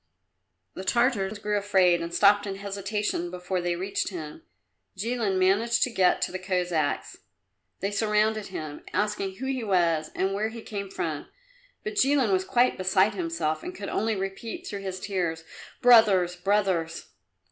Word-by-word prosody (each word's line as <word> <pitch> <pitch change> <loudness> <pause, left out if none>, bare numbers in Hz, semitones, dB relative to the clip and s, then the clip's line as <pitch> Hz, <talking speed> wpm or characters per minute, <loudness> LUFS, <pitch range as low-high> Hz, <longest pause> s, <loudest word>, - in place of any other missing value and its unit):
The 190 - -7
Tartars 220 -2 +1
grew 210 0 -1
afraid 185 -4 +3
and 170 0 -4
stopped 205 +3 +4
in 195 - -3
hesitation 200 -2 -3
before 180 +1 -3
they 175 0 -1
reached 190 +3 -2
him. 160 -6 -7 0.6
Jilin 220 -2 -1
managed 205 +6 +3
to 255 - 0
get 190 -5 +3
to - - -1
the 185 - -4
Cossacks. 180 -5 -1 0.6
They 195 +2 -1
surrounded 215 0 +1
him, 155 -5 -7
asking 205 -2 -1
who 260 - -6
he 265 -2 -2
was 170 -6 +1
and 190 +1 0
where 210 +2 -1
he 225 0 -9
came 200 -2 -5
from, 155 -5 -4 0.6
but 420 -1 -5
Jilin 270 - +3
was 190 0 +2
quite 245 -1 +2
beside 190 +3 +3
himself 165 -4 -2
and 180 - -7
could 200 0 -6
only 220 +1 0
repeat, 195 +3 -5
through 200 -1 -5
his 190 -1 -5
tears, 175 -5 -2 0.4
"Brothers, 205 -7 +6
brothers!" 185 -3 0
195 Hz, 160 wpm, -27 LUFS, 180-210 Hz, 0.6 s, Brothers